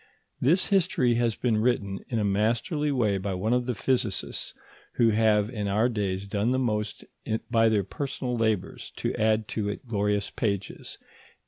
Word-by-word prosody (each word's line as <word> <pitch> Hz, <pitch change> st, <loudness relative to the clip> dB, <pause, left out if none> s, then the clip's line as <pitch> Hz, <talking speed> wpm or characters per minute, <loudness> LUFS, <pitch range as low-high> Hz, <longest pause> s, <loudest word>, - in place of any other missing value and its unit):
This 170 Hz, +8 st, +3 dB
history 160 Hz, -10 st, +3 dB
has 115 Hz, -2 st, +1 dB
been 115 Hz, -4 st, +1 dB
written 105 Hz, -4 st, 0 dB
in 115 Hz, -, -1 dB
a 110 Hz, -, +1 dB
masterly 115 Hz, -, +1 dB
way 110 Hz, -7 st, +1 dB
by 95 Hz, 0 st, -3 dB
one 110 Hz, +6 st, 0 dB
of 125 Hz, 0 st, +1 dB
the 125 Hz, -, -1 dB
physicists 115 Hz, -3 st, -1 dB, 0.4 s
who 115 Hz, -2 st, +4 dB
have 105 Hz, -1 st, +3 dB
in 105 Hz, -4 st, -3 dB
our 105 Hz, +5 st, +2 dB
days 100 Hz, -4 st, -2 dB
done 100 Hz, +3 st, 0 dB
the 130 Hz, -, +2 dB
most 105 Hz, -4 st, -2 dB, 0.5 s
by 115 Hz, -1 st, +4 dB
their 105 Hz, -2 st, +2 dB
personal 130 Hz, +4 st, -4 dB
labours 110 Hz, -4 st, -1 dB
to -, -, -2 dB
add 110 Hz, 0 st, +1 dB
to 105 Hz, -2 st, -2 dB
it 105 Hz, -, -6 dB
glorious 105 Hz, -2 st, 0 dB
pages. 100 Hz, -4 st, -3 dB
110 Hz, 165 wpm, -27 LUFS, 100-125 Hz, 0.5 s, who